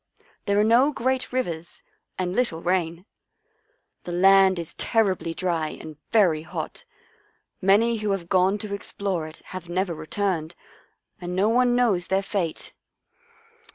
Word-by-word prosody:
There 200 0 +3
are - - +5
no 240 +6 +4
great 260 -1 -1
rivers 175 -10 -4 0.3
and 180 0 -2
little 170 -10 0
rain. 175 -1 -1 1.0
The 175 - -6
land 190 +1 +5
is 170 -2 -5
terribly 190 -7 0
dry 170 -4 -1
and 155 -1 -9 0.2
very 180 -9 +4
hot. 160 - -6 0.8
Many 215 +5 +4
who 215 -1 -2
have 195 -4 -2
gone 185 +2 +3
to 205 - -5
explore 195 -4 -3
it 155 - -13
have 180 -2 -7
never 180 0 -1
returned 165 0 -2 0.7
and 180 0 -4
no 200 +4 +2
one 245 +1 +3
knows 210 -8 +2
their 195 +1 +1
fate. 185 -5 -3
190 Hz, 140 wpm, -24 LUFS, 175-210 Hz, 1.0 s, are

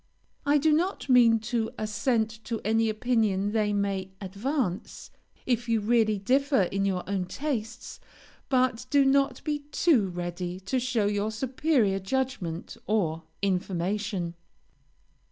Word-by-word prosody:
I 290 +1 +5
do 305 +2 +3
not 345 -1 0
mean, 240 -3 +6
to 225 0 -1
assent 220 0 -1
to 230 -3 -3
any 225 +1 +2
opinion 215 -3 +1
they 215 -1 +1
may 200 -2 -1
advance, 205 - -3 0.3
if 240 -1 0
you 225 -1 +3
really 215 0 +2
differ 265 +3 +2
in 195 +2 -1
your 185 -2 -1
own 195 -2 -1
tastes, 230 -1 -4 0.5
but 255 -2 +1
do 280 0 +4
not 275 0 +2
be 300 -1 -1
too 285 - +3
ready 175 +1 -4
to 255 +7 -1
show 245 -4 0
your 205 +1 0
superior 245 -3 +1
judgment 195 -6 -3
or 170 -7 0 0.2
information. 190 0 -1
220 Hz, 130 wpm, -27 LUFS, 195-255 Hz, 0.5 s, mean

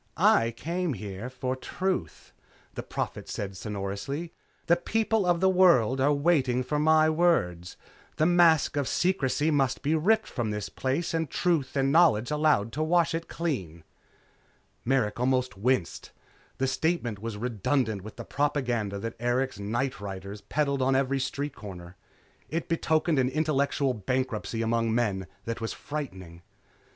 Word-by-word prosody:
"I 115 - +4
came 170 0 -2 0.3
for 130 0 -3
truth," 185 +8 -4 0.4
the - - -4
Prophet - - -5
said 100 -1 -4
sonorously. 105 - -4 0.3
"The 170 - +5
people 220 +1 0
of 175 -1 +2
the 190 - +5
world 135 -10 +4
are 140 +2 +4
waiting 140 -4 +2
for 150 +4 -1
my 155 +1 +5
words. 155 - +1 0.4
The 155 - +3
mask 165 -4 +4
of 140 -2 0
secrecy 160 -4 +1
must 135 -3 +1
be 150 - +1
ripped 215 +8 +3
from 120 -4 -3
this 105 -1 -3
place 135 +7 -2
and 160 -3 -1
truth 165 -6 0
and 135 0 +2
knowledge 150 -7 +4
allowed 150 -8 +2
to 155 - -2
wash 170 +1 +2
it 165 +1 -3
clean." 95 - -4 1.0
Merrick 120 -4 0
almost 125 -3 +1
winced. 100 -3 -1 0.5
The 135 - 0
statement 130 - -1
was 110 0 -5
redundant 110 -1 -1
with 110 +3 -10
the - - -8
propaganda 125 -8 -1
that 115 +3 -4
Erikson's 120 -3 -1
nightriders 105 -5 -4
peddled 140 -2 0
on 130 +1 +2
every 135 0 +1
street 140 +2 -3
corner. 90 -3 -10 0.5
It 165 +2 -3
betokened 160 -2 +1
an 130 -1 +2
intellectual 140 -2 +1
bankruptcy 115 0 -2
among 115 0 +1
men 100 -6 0 0.2
that 115 0 -4
was 115 - -3
frightening. 95 - -7
130 Hz, 145 wpm, -27 LUFS, 115-155 Hz, 1.0 s, The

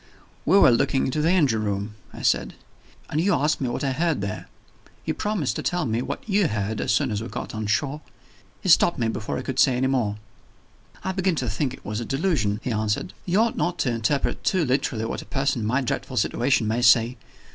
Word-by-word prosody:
"We 195 - +6
were 130 - +7
looking 125 +3 +2
into 140 +4 -1
the 160 - +2
engine 140 -12 +3
room," 100 +1 -2 0.2
I - - -9
said; - - +1 0.6
"and 155 - +1
you 200 +4 +3
asked 150 +1 +1
me 130 - 0
what 120 - -3
I 135 - +1
heard 165 +3 0
there. 100 -1 -4 0.6
You - - 0
promised 210 -10 -1
to - - -2
tell 175 -3 -1
me 115 -1 0
what - - -5
you 200 -3 +3
heard, 105 -1 -2
as - - 0
soon 140 -5 +1
as 105 0 -2
we 115 - -5
got - - -6
on 110 -1 -3
shore 140 +7 0 0.3
" - - -31
He 185 - -1
stopped 170 +1 +5
me, 115 -2 0
before 110 -1 -3
I - - -4
could 130 -1 -3
say 130 -2 +4
more. 130 -6 +1 0.9
"I 190 - -1
begin 190 -2 0
to 130 -5 -2
think 130 +5 -1
it - - -21
was 105 +1 -3
a 120 - -4
delusion," 135 - 0
he 125 - -2
answered. 105 -3 -1
"You 185 +5 +3
ought 230 0 0
not 175 0 0
to 125 - 0
interpret 115 +5 -1
too 185 -4 +2
literally 125 -4 0
what - - -4
a - - -12
person 135 -3 -1
in 105 - -1
my 130 +5 +1
dreadful 125 - -3
situation 120 -3 +1
may 115 +3 0
say. 120 +1 +5
130 Hz, 230 wpm, -24 LUFS, 110-155 Hz, 0.9 s, were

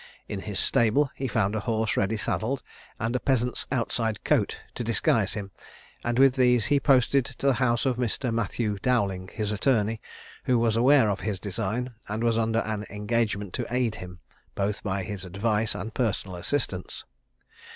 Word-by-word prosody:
In 100 - -4
his 105 -1 -2
stable 125 +5 +4
he 135 - -3
found 100 -3 +1
a - - 0
horse 110 -1 -1
ready 105 +3 +1
saddled, 115 +7 -1 0.4
and 115 +3 -1
a - - +2
peasant's 125 -2 +1
outside 115 -4 -1
coat - - +1
to - - -4
disguise - - +2
him; 100 -2 -5 0.5
and 120 0 -1
with 135 0 +6
these 125 -4 +3
he 140 +5 +3
posted 135 0 +4
to 130 +2 -7
the 140 - +5
house 120 0 +1
of 130 -3 +1
Mr. 125 0 -1
Matthew 105 -1 -1
Dowling, 100 -7 0
his 105 -1 -2
attorney, 110 0 +1 0.4
who 125 - +3
was 115 -1 +2
aware 130 +1 +5
of 100 - -3
his 100 -3 -3
design, 115 +6 -3 0.2
and 110 +2 -2
was 115 -1 +2
under 115 0 +1
an 105 -1 -3
engagement 105 -2 -1
to - - -3
aid 125 -2 0
him, 90 -3 -8 0.4
both 100 +1 -1
by 95 -1 -2
his 100 0 -5
advice 105 +4 0
and 110 +4 -5
personal 100 -6 -1
assistance. 90 -1 -2
110 Hz, 175 wpm, -26 LUFS, 105-125 Hz, 0.5 s, with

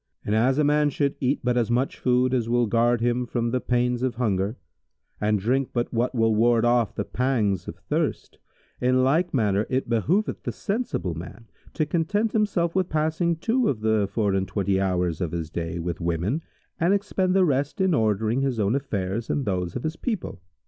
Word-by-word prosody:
And 105 - -1
as 125 +5 +3
a 150 - +3
man 150 0 +3
should 140 0 0
eat 135 +2 0
but 125 0 +1
as 120 -2 +1
much 125 +3 0
food 125 0 +2
as 120 -3 0
will 120 0 +3
guard 115 +1 +2
him 120 +1 0
from 120 0 -1
the 130 0 0
pains 125 0 0
of 130 -2 -1
hunger 105 -2 -1 0.6
and 105 0 +2
drink 125 +6 0
but 120 -1 -2
what 120 +3 0
will 115 -1 +3
ward 115 +1 +3
off 120 -2 +2
the 100 - -2
pangs 115 -7 0
of - - -6
thirst, - - -3 0.4
in 130 +1 +3
like 160 +7 +2
manner 105 -5 +1
it 130 0 -1
behoveth 160 - 0
the - - -3
sensible 200 - -2
man 90 +7 -9 0.3
to 155 - +1
content 190 +8 0
himself 195 -6 +1
with 185 -1 0
passing 160 +2 0
two 230 +9 +1
of 115 -6 -2
the 110 -2 +2
four 105 -4 +1
and 95 0 0
twenty 100 -2 0
hours 90 -2 0
of 85 -3 -2
his 80 -2 -4
day 85 0 -3
with 85 +1 -4
women 85 - -1 0.4
and 180 +3 +3
expend 190 -2 0
the 190 -1 +5
rest 140 +4 0
in 190 -2 +2
ordering 110 0 +1
his 135 -4 -1
own 100 +1 +2
affairs 110 -5 -2
and 140 - -1
those 90 -4 -2
of 125 - -4
his 155 +1 -3
people. 215 - -4
120 Hz, 200 wpm, -25 LUFS, 105-145 Hz, 0.6 s, the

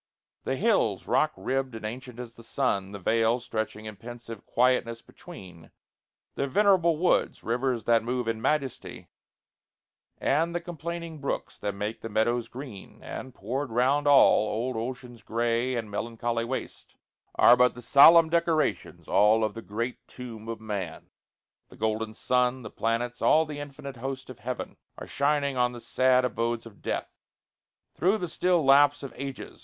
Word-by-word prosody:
The 130 - 0
hills 175 - +1
Rock 135 +5 +2
ribbed 130 -2 -2
and 110 - -7
ancient 125 +2 -7
as 120 -2 -7
the 115 - -14
sun, 100 -6 -1
the 100 - -6
vales 115 +4 +1
Stretching 110 -1 -4
in 110 -2 -8
pensive 115 0 -9
quietness 120 -2 +1
between; 90 - -13 0.6
The 140 - -2
venerable 175 0 +3
woods 180 +3 +1
rivers 120 0 -1
that 115 -1 +3
move 125 0 -2
In 115 -1 -2
majesty, 135 0 -2 1.1
and 165 +5 +1
the - - +1
complaining 170 -1 -6
brooks 140 - -4
That 100 - -3
make 105 +3 -4
the 115 - -6
meadows 115 +2 0
green; 120 -5 -10
and, 130 - -7
poured 130 +7 -3
round 130 +5 +2
all, 135 -6 +6
Old 120 +4 -2
Ocean's 120 0 -6
gray 120 +3 0
and 110 -3 -4
melancholy 115 +2 -2
waste, 130 +2 -6 0.4
Are - - +7
but 125 0 +3
the 120 - -10
solemn 160 +4 +8
decorations 170 -2 0
all 110 +2 +4
Of 110 -1 0
the 115 - -7
great 115 +4 -5
tomb 115 -3 -9
of 115 - -4
man. 100 -7 -6 0.6
The - - -15
golden 110 0 -2
sun, 125 +1 +1
The 110 - -8
planets, 120 +2 -2
all 160 +1 +4
the 150 -1 -7
infinite 140 -2 -8
host 130 +1 -5
of 120 - -13
heaven, 125 +2 -5 0.2
Are - - -7
shining 140 -1 0
on 125 0 +2
the 120 - -8
sad 130 +1 +2
abodes 115 -1 -2
of 110 -3 -14
death, - - -3 0.8
Through 190 +5 +2
the 180 - -3
still 175 -1 +1
lapse 145 +1 +5
of 135 -4 -7
ages. 135 0 -7
125 Hz, 160 wpm, -27 LUFS, 115-140 Hz, 1.1 s, solemn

